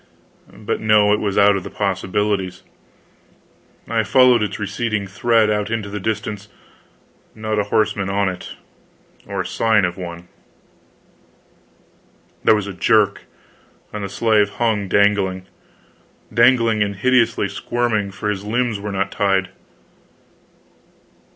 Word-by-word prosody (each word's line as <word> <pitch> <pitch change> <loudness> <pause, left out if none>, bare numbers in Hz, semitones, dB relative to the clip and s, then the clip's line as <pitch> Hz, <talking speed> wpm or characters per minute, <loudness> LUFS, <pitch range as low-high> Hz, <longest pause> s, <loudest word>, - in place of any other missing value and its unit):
But 105 - -4
no, 105 -1 +4
it 105 - +1
was 100 -2 -2
out 100 0 +5
of 95 - -3
the - - -7
possibilities. 95 -1 -2 1.2
I - - +1
followed 125 -3 +4
its 105 -2 -2
receding 105 +1 -2
thread 110 +2 +2
out 105 0 -1
into 110 -3 -3
the 105 - -4
distance 105 0 -4 0.9
not 110 -1 -2
a 105 - 0
horseman 105 -2 0
on 100 0 +1
it, 90 -1 -6 0.7
or 100 -2 -3
sign 110 +2 +2
of 90 +1 -4
one. 85 -1 -8 2.2
There 110 - +5
was 105 -2 -2
a 100 - -6
jerk, 90 - +2 0.7
and 105 -1 -5
the 100 - -4
slave 105 -1 +2
hung 110 -4 0
dangling; 95 -2 +1 0.9
dangling 115 -2 +4
and 100 -1 0
hideously 115 -1 +2
squirming, 110 -1 -2
for 100 +2 -3
his 100 -1 -5
limbs 115 0 -1
were 105 0 -5
not 100 0 -2
tied. 95 -2 +1
105 Hz, 125 wpm, -20 LUFS, 100-110 Hz, 2.2 s, out